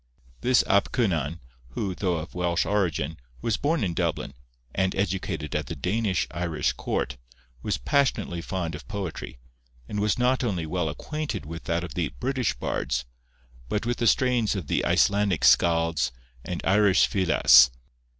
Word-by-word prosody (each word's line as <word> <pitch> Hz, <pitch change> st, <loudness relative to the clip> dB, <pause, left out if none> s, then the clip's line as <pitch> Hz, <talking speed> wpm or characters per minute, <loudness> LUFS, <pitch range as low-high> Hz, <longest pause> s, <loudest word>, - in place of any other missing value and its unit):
This 125 Hz, 0 st, +4 dB
Ap 100 Hz, -, +3 dB
Cynan, 85 Hz, -, 0 dB, 0.3 s
who, 95 Hz, +3 st, -2 dB
though 90 Hz, -1 st, -1 dB
of 80 Hz, +1 st, -6 dB
Welsh 85 Hz, -1 st, 0 dB
origin, 80 Hz, -7 st, 0 dB, 0.2 s
was 110 Hz, -, 0 dB
born 150 Hz, +1 st, 0 dB
in 90 Hz, -4 st, -1 dB
Dublin, 70 Hz, -, -2 dB, 0.4 s
and 95 Hz, 0 st, 0 dB
educated 90 Hz, -5 st, -2 dB
at 75 Hz, -2 st, -1 dB
the 80 Hz, -, -5 dB
Danish 95 Hz, +2 st, 0 dB
Irish 85 Hz, -2 st, -1 dB
court, -, -, -3 dB, 0.4 s
was 105 Hz, -, -1 dB
passionately 135 Hz, -, 0 dB
fond 85 Hz, -2 st, -3 dB
of 75 Hz, -, -9 dB
poetry, 90 Hz, -11 st, -5 dB, 0.5 s
and 105 Hz, -, -3 dB
was 105 Hz, 0 st, +1 dB
not 125 Hz, +1 st, +2 dB
only 95 Hz, -9 st, -1 dB
well 80 Hz, 0 st, -1 dB
acquainted 140 Hz, -, -4 dB
with 80 Hz, +2 st, -8 dB
that 85 Hz, +1 st, -1 dB
of 85 Hz, -4 st, -6 dB
the 85 Hz, 0 st, -1 dB
British 130 Hz, -2 st, 0 dB
bards, -, -, -2 dB, 0.6 s
but 105 Hz, +2 st, -1 dB
with 120 Hz, 0 st, -1 dB
the 120 Hz, -, +1 dB
strains 120 Hz, -3 st, +2 dB
of 95 Hz, -5 st, -4 dB
the -, -, 0 dB
Icelandic 100 Hz, -5 st, +2 dB
skalds 80 Hz, -6 st, +3 dB, 0.3 s
and 90 Hz, -2 st, -5 dB
Irish 100 Hz, 0 st, +5 dB
fileas. 65 Hz, -10 st, +6 dB
90 Hz, 155 wpm, -26 LUFS, 80-105 Hz, 0.6 s, fileas